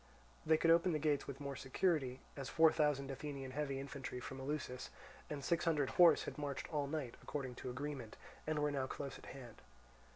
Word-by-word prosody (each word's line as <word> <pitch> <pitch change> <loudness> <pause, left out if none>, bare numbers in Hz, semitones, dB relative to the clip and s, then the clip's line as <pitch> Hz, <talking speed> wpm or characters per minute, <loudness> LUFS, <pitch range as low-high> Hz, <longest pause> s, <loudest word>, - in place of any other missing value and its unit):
They 160 0 +6
could 165 +1 +4
open 170 +1 +5
the - - +2
gates 150 -1 +1
with 140 -1 -6
more 140 -1 -4
security, 135 -2 0
as 135 -2 -5
four 160 -1 +6
thousand 145 -3 +1
Athenian 135 -1 -5
heavy 140 -1 -2
infantry 135 -2 -5
from 135 +2 -6
Eleusis, 130 -2 -3 0.4
and 145 -2 -4
six 170 0 +2
hundred 150 -5 +2
horse, 175 -2 +7
had - - -6
marched 140 -2 -3
all 145 -2 +1
night, 140 -5 -3
according 135 -4 -4
to 130 - -5
agreement, 130 -3 -5 0.3
and 155 -1 +1
were 150 0 +2
now 135 -2 -1
close 140 0 -5
at - - -13
hand. 125 -4 -10
140 Hz, 195 wpm, -38 LUFS, 135-150 Hz, 0.4 s, horse